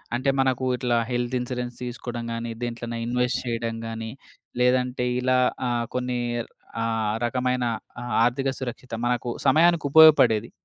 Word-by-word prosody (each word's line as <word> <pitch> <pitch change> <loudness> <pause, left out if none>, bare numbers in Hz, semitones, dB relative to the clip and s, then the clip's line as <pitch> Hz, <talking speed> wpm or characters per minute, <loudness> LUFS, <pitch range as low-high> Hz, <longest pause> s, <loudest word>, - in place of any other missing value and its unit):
అంటే 130 +3 +1
మనకు 130 -1 +1
ఇట్లా 120 -1 0
హెల్త్ 120 0 -1
ఇన్స్యూరెన్స్ 125 0 -4
తీసుకోవడం 120 -1 -5
గానీ, 115 0 -4
దేంట్లోన 120 0 -4
ఇన్‌వెస్ట్ 125 +1 0
చేయడం 115 -1 -2
గానీ 115 0 -5 0.5
లేదంటే 125 0 +2 0.2
ఇలా 130 0 +2 0.3
ఆహ్, 120 -1 0
కొన్ని 125 0 -1 0.6
ఆహ్, 115 -2 0
రకమైన 125 +1 0 0.6
ఆర్థిక 130 +3 0
సురక్షిత 125 -1 -6
మనకు 120 0 -1 0.2
సమయానికుపయోగపడేది. 155 -6 +5
125 Hz, 120 wpm, -25 LUFS, 120-130 Hz, 0.6 s, సమయానికుపయోగపడేది